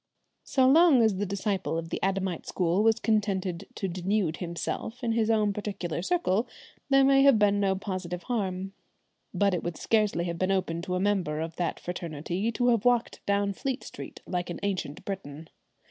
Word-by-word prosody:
So 260 Hz, -1 st, +3 dB
long 295 Hz, -3 st, +6 dB
as 215 Hz, -4 st, +2 dB
the 205 Hz, +1 st, -1 dB
disciple 195 Hz, -3 st, -1 dB
of 165 Hz, 0 st, -4 dB
the -, -, -4 dB
Adamite 190 Hz, -3 st, -1 dB
school 180 Hz, +2 st, +1 dB
was 225 Hz, +1 st, +3 dB
contented 200 Hz, -6 st, 0 dB
to 195 Hz, -, -2 dB
denude 185 Hz, -1 st, -1 dB
himself 180 Hz, +7 st, -4 dB
in 235 Hz, -, +1 dB
his 225 Hz, -1 st, +1 dB
own 215 Hz, -2 st, +2 dB
particular 195 Hz, -5 st, -4 dB
circle 235 Hz, -, +1 dB, 0.4 s
there 275 Hz, 0 st, +5 dB
may 270 Hz, 0 st, +5 dB
have 275 Hz, -4 st, +6 dB
been 205 Hz, -1 st, +3 dB
no 195 Hz, -1 st, +2 dB
positive 185 Hz, -2 st, -4 dB
harm, 195 Hz, -5 st, -2 dB, 0.6 s
but 200 Hz, -1 st, +2 dB
it 180 Hz, -, 0 dB
would 175 Hz, -2 st, -4 dB
scarcely 210 Hz, -6 st, +1 dB
have 170 Hz, -1 st, -4 dB
been 185 Hz, -, +1 dB
open 170 Hz, -3 st, -1 dB
to 180 Hz, 0 st, -3 dB
a -, -, 0 dB
member 185 Hz, -6 st, 0 dB
of 165 Hz, 0 st, -4 dB
that 175 Hz, -, -2 dB
fraternity 175 Hz, +4 st, -3 dB
to 245 Hz, +2 st, +1 dB
have 230 Hz, -3 st, +2 dB
walked 245 Hz, -1 st, +1 dB
down 200 Hz, 0 st, +1 dB
Fleet 265 Hz, +6 st, -3 dB
Street -, -, -9 dB
like 180 Hz, -1 st, -3 dB
an 175 Hz, -, -5 dB
ancient 185 Hz, -7 st, -3 dB
Briton. 160 Hz, -5 st, -6 dB
195 Hz, 185 wpm, -28 LUFS, 180-220 Hz, 0.6 s, long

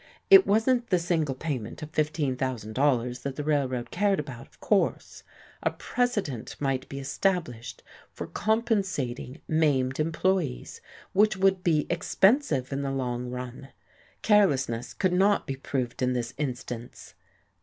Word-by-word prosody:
It 390 Hz, -1 st, +9 dB
wasn't 235 Hz, +3 st, +2 dB
the 185 Hz, -, +4 dB
single 165 Hz, -5 st, 0 dB
payment 130 Hz, -4 st, -4 dB
of 155 Hz, -, -8 dB
$15,000 130 Hz, -4 st, 0 dB
that 140 Hz, -1 st, -4 dB
the 150 Hz, -, -4 dB
Railroad 135 Hz, -5 st, -1 dB
cared 200 Hz, +1 st, +1 dB
about, 130 Hz, -5 st, -7 dB
of -, -, -27 dB
course; 205 Hz, -2 st, 0 dB, 0.4 s
a -, -, +2 dB
precedent 205 Hz, -, -2 dB
might 135 Hz, -2 st, -1 dB
be 135 Hz, -, -6 dB
established 140 Hz, -, -2 dB, 0.3 s
for -, -, -6 dB
compensating 190 Hz, -, -1 dB
maimed 140 Hz, -5 st, +1 dB
employees 165 Hz, -, -1 dB, 0.3 s
which 210 Hz, 0 st, +3 dB
would 190 Hz, -1 st, +2 dB
be 155 Hz, -4 st, +2 dB
expensive 170 Hz, -, +2 dB
in 140 Hz, -, -2 dB
the 140 Hz, -, -2 dB
long 125 Hz, -2 st, -2 dB
run. 125 Hz, +2 st, -7 dB, 0.5 s
Carelessness 135 Hz, -, +2 dB
could 185 Hz, -2 st, +1 dB
not 200 Hz, +3 st, +3 dB
be 135 Hz, -, -3 dB
proved 130 Hz, -1 st, -3 dB
in 125 Hz, 0 st, +2 dB
this 120 Hz, 0 st, -3 dB
instance. 125 Hz, -4 st, -6 dB
145 Hz, 135 wpm, -27 LUFS, 125-190 Hz, 0.5 s, It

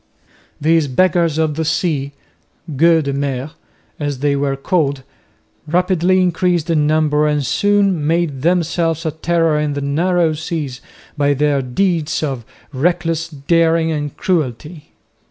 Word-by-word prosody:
These 160 Hz, 0 st, +2 dB
"Beggars 170 Hz, +2 st, +2 dB
of 160 Hz, -1 st, +1 dB
the 160 Hz, +2 st, -2 dB
Sea" 155 Hz, -3 st, -1 dB, 0.6 s
(Gueux 165 Hz, +2 st, +4 dB
de 140 Hz, -1 st, -2 dB
mer), 140 Hz, 0 st, -3 dB, 0.5 s
as 145 Hz, -2 st, -2 dB
they 140 Hz, +1 st, 0 dB
were 140 Hz, -1 st, 0 dB
called, 140 Hz, -2 st, -1 dB, 0.6 s
rapidly 180 Hz, +2 st, +2 dB
increased 175 Hz, -2 st, 0 dB
in 150 Hz, -2 st, +2 dB
number 150 Hz, -1 st, +2 dB
and 150 Hz, -2 st, 0 dB
soon 200 Hz, -3 st, +1 dB
made 165 Hz, -5 st, 0 dB
themselves 165 Hz, 0 st, 0 dB
a 160 Hz, -, 0 dB
terror 165 Hz, 0 st, +1 dB
in 150 Hz, -1 st, -1 dB
the 145 Hz, -, -3 dB
narrow 165 Hz, +3 st, +1 dB
seas 150 Hz, -4 st, -5 dB, 0.3 s
by 145 Hz, 0 st, +1 dB
their 145 Hz, 0 st, +1 dB
deeds 155 Hz, +4 st, -1 dB
of 135 Hz, -5 st, -3 dB, 0.3 s
reckless 165 Hz, +2 st, 0 dB
daring 165 Hz, +2 st, +1 dB
and 145 Hz, -2 st, -4 dB
cruelty. 155 Hz, -1 st, -3 dB
155 Hz, 135 wpm, -17 LUFS, 145-170 Hz, 0.6 s, Gueux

